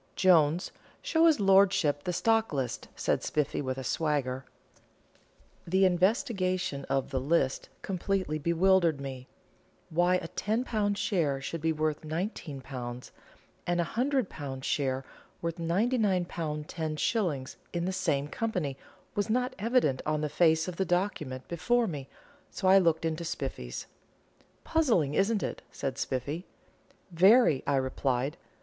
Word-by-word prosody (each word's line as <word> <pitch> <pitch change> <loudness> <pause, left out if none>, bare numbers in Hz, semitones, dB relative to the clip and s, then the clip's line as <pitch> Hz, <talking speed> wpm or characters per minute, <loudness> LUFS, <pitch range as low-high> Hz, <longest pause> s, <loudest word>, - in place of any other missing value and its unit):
"Jones, 170 -2 +4 0.3
show 325 +1 +4
his 315 -6 +4
lordship 190 -7 +4
the 180 - 0
stock 225 +5 +2
list," 135 -5 -3
said - - 0
Spiffy, 150 -1 -1
with 130 -2 -3
a 135 - -4
swagger. 135 -3 -1 1.2
The 190 +3 +4
investigation 185 - +1
of 135 0 -1
the 130 - 0
"list" 135 -1 0
completely 185 -4 -1
bewildered 170 0 +3
me. 135 -2 -7 0.6
Why 175 +3 +3
a 180 - -2
£10 215 -2 -1
share 155 -12 0
should 155 +4 -5
be 160 +1 +2
worth 155 -1 -1
£19, 135 - -5 0.6
and 175 0 +1
a - - +3
£100 200 - -2
share 135 -2 -1 0.3
worth 170 0 -3
£99, 195 +2 +1 0.4
10s., 155 - -1 0.2
in 170 0 -2
the 190 - -1
same 145 -6 0
company, 170 -8 -2 0.4
was 205 +1 -1
not 250 +3 +1
evident 220 - +2
on 155 0 -1
the 150 - -1
face 160 +1 +3
of 180 -2 -5
the 190 - +2
document 170 -8 -2
before 235 +8 +1
me, 145 -9 -5 0.4
so 190 - -2
I 190 +1 +8
looked 165 -3 +2
into 165 +1 -2
Spiffy's. 135 - -5 0.8
"Puzzling, 230 - +2
isn't 200 +5 +2
it?" - - -4
said 135 -1 -4
Spiffy. 140 +7 -3 0.6
"Very," 185 - +5
I 140 - +2
replied. 130 +1 0
165 Hz, 130 wpm, -29 LUFS, 140-195 Hz, 1.2 s, I